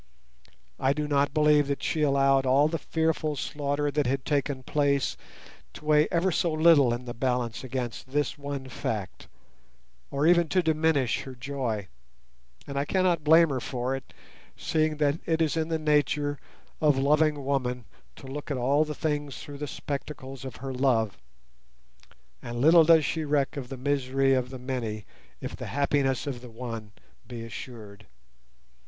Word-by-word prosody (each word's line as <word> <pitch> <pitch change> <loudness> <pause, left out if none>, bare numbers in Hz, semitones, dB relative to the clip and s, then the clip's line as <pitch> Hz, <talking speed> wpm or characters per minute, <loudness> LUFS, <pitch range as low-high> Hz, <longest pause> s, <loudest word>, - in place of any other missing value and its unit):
I 135 - +2
do 150 +1 -2
not 145 -1 +2
believe 150 -1 +4
that 140 0 -3
she 155 - -1
allowed 135 -2 +3
all 140 +3 +5
the 165 +1 -2
fearful 160 -1 -1
slaughter 145 +1 -2
that 145 -2 0
had 130 +1 -1
taken 140 -2 -1
place 140 -1 +1 0.6
to - - -12
weigh 150 0 +4
ever 175 +2 +1
so 170 0 +1
little 155 -5 +5
in 120 +1 -3
the 120 - -5
balance 125 -2 -1
against 130 -1 -5
this 145 +2 0
one 140 -2 -6
fact, 105 -6 -5 0.8
or 140 +2 0
even 170 -1 +4
to - - -4
greatly 160 -1 +2
diminish 155 -6 +1
her 130 -1 -9
joy; 120 -6 -3 0.8
and 140 0 -3
I - - +1
cannot 180 -2 +1
blame 160 +2 +6
her 135 -2 -1
for 125 +1 -2
it, 135 - -9 0.5
seeing 155 -1 0
that 150 +1 +1
it 160 -1 +1
is 160 -2 +2
the 160 0 0
nature 145 -1 +1 0.4
of 150 -3 +4
loving 150 +1 +2
woman 125 -3 -1 0.3
to - - -13
look 140 +3 -7
at 140 - -1
all 140 +5 +3
things 150 -2 -3
through 145 -1 -9
the 150 - -3
spectacles 135 -2 -6
of 130 -3 -7
her 135 +2 -6
love, 120 -7 +1 1.3
and 120 0 -5
little 160 +4 +7
does 160 -2 +6
she 160 - -1
reck 145 -1 0
of 130 -4 -6
the 135 - -6
misery 135 0 +1
of 130 -1 0
the 130 - -7
many 120 -5 -4 0.4
if - - -5
the - - -7
happiness 140 -2 0
of 130 -4 -4
the 125 - -10
one 115 -2 -7 0.4
be 120 -2 -7
assured. 110 -3 -9
140 Hz, 165 wpm, -27 LUFS, 130-150 Hz, 1.3 s, little